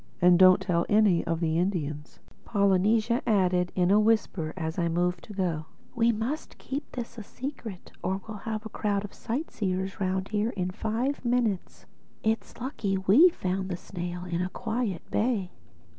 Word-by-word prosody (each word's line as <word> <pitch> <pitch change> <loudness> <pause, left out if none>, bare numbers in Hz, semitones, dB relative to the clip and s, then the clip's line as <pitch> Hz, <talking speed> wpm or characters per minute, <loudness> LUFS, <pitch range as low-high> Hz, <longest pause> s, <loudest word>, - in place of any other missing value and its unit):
"And 175 0 +6
don't 185 -1 +8
tell 180 -3 +1
any 205 -5 +4
of 165 0 -1
the 160 0 +1
Indians," 155 -5 -2 0.3
Polynesia 210 +3 +2
added 180 -4 +2
in 180 0 +3
a 205 - +6
whisper 210 -7 +1
as 160 0 -3
I 170 - +2
moved 175 +1 0
to 210 - -10
go. 170 -5 -1 0.3
"We 235 -1 +3
must 235 +8 -4
keep 280 +2 -5
this 235 -2 -6
a - - -6
secret 235 -5 -7
or 190 +1 -1
we'll 215 -2 -6
have 215 0 -3
a - - -5
crowd 205 -1 -1
of 205 - -10
sightseers 200 - -3
round 190 0 -1
here 215 +1 0
in 180 0 -1
five 230 +9 -2
minutes. 235 -6 -1 0.4
It's 220 +1 0
mighty 225 -6 -2
lucky 190 - -5
we 280 - +8
found 190 - -3
the 175 - -2
snail 175 -1 -6
in 175 -1 -2
a 180 - -1
quiet 220 -2 -2
bay." 210 -5 0
195 Hz, 175 wpm, -28 LUFS, 180-225 Hz, 0.4 s, don't